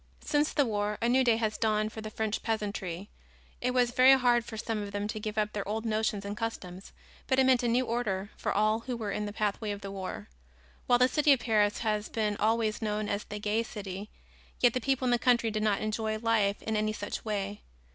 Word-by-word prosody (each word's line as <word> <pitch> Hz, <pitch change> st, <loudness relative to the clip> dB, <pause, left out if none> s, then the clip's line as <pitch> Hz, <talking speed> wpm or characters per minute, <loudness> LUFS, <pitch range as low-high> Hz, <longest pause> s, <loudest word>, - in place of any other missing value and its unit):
Since 295 Hz, +1 st, +2 dB
the 285 Hz, -, +3 dB
war 210 Hz, -2 st, -1 dB
a 235 Hz, -, +1 dB
new 260 Hz, +2 st, +4 dB
day 235 Hz, -3 st, +3 dB
has 220 Hz, -2 st, -1 dB
dawned 215 Hz, 0 st, +1 dB
for 220 Hz, -, -6 dB
the 215 Hz, -, -6 dB
French 220 Hz, 0 st, -2 dB
peasantry. 200 Hz, -4 st, -3 dB, 0.5 s
It 250 Hz, -, +1 dB
was 250 Hz, -1 st, +2 dB
very 260 Hz, +2 st, +7 dB
hard 245 Hz, -2 st, +3 dB
for 225 Hz, -1 st, -8 dB
some 215 Hz, 0 st, -2 dB
of 205 Hz, -1 st, -5 dB
them 205 Hz, +1 st, -2 dB
to 215 Hz, -, -4 dB
give 215 Hz, 0 st, -5 dB
up 210 Hz, 0 st, 0 dB
their 205 Hz, -2 st, -3 dB
old 220 Hz, +2 st, -2 dB
notions 215 Hz, -2 st, 0 dB
and 200 Hz, +1 st, -4 dB
customs, 195 Hz, -4 st, -5 dB, 0.4 s
but 260 Hz, -, +2 dB
it 265 Hz, -, +5 dB
meant 260 Hz, -2 st, +4 dB
a 240 Hz, -, 0 dB
new 245 Hz, +2 st, +2 dB
order 210 Hz, -5 st, -2 dB
for -, -, -2 dB
all 215 Hz, +2 st, +2 dB
who 240 Hz, +1 st, -5 dB
were 215 Hz, -3 st, -3 dB
in 210 Hz, +1 st, -2 dB
the -, -, -4 dB
pathway 210 Hz, +1 st, -2 dB
of 205 Hz, 0 st, -4 dB
the 200 Hz, -1 st, -6 dB
war. 185 Hz, -, -6 dB, 0.6 s
While 245 Hz, -, +5 dB
the 250 Hz, +1 st, +5 dB
city 300 Hz, +2 st, +3 dB
of 265 Hz, -, +1 dB
Paris 210 Hz, -3 st, +2 dB
has 215 Hz, -2 st, -1 dB
been 210 Hz, -2 st, -1 dB
always 220 Hz, 0 st, +1 dB
known 210 Hz, -1 st, -1 dB
as 200 Hz, +1 st, -2 dB
the 210 Hz, -, -6 dB
Gay 210 Hz, +2 st, 0 dB
City, 205 Hz, -3 st, -6 dB, 0.5 s
yet 245 Hz, -2 st, +4 dB
the 255 Hz, -, -1 dB
people 270 Hz, 0 st, 0 dB
in 245 Hz, -, +2 dB
the 240 Hz, -, +3 dB
country 235 Hz, -2 st, +3 dB
did 215 Hz, 0 st, -2 dB
not 210 Hz, -2 st, +1 dB
enjoy 215 Hz, 0 st, -1 dB
life 215 Hz, -3 st, +1 dB
in 220 Hz, -, -2 dB
any 215 Hz, 0 st, 0 dB
such 205 Hz, -1 st, -5 dB
way. 205 Hz, -2 st, -3 dB
215 Hz, 235 wpm, -30 LUFS, 205-235 Hz, 0.6 s, very